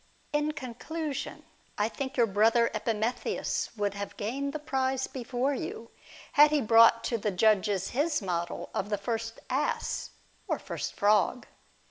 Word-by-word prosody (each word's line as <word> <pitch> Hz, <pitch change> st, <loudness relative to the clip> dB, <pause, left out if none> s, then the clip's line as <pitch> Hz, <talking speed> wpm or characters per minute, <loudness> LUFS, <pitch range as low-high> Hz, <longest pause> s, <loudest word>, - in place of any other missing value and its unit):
In 295 Hz, +1 st, +1 dB
conclusion, 280 Hz, +3 st, -5 dB, 0.3 s
I 210 Hz, -, +2 dB
think 265 Hz, +3 st, -5 dB
your 240 Hz, -, +5 dB
brother 225 Hz, +3 st, +3 dB
Epimetheus 220 Hz, +2 st, -1 dB
would 205 Hz, -1 st, 0 dB
have 200 Hz, 0 st, -6 dB
gained 270 Hz, +7 st, -2 dB
the 310 Hz, -, -3 dB
prize 265 Hz, -3 st, -1 dB
before 255 Hz, +2 st, -2 dB
you, 230 Hz, -3 st, -6 dB, 0.4 s
had 295 Hz, +1 st, +7 dB
he 300 Hz, 0 st, +2 dB
brought 230 Hz, -1 st, +6 dB
to 235 Hz, -, -1 dB
the 210 Hz, -, 0 dB
judges 200 Hz, -1 st, +2 dB
his 295 Hz, +4 st, +1 dB
model 175 Hz, -3 st, -3 dB
of 195 Hz, -, -2 dB
the 205 Hz, -, 0 dB
first 225 Hz, +2 st, -3 dB
ass, 285 Hz, +3 st, -1 dB, 0.4 s
or -, -, 0 dB
first -, -, -5 dB
frog. 210 Hz, +4 st, +2 dB
230 Hz, 145 wpm, -29 LUFS, 210-270 Hz, 0.4 s, had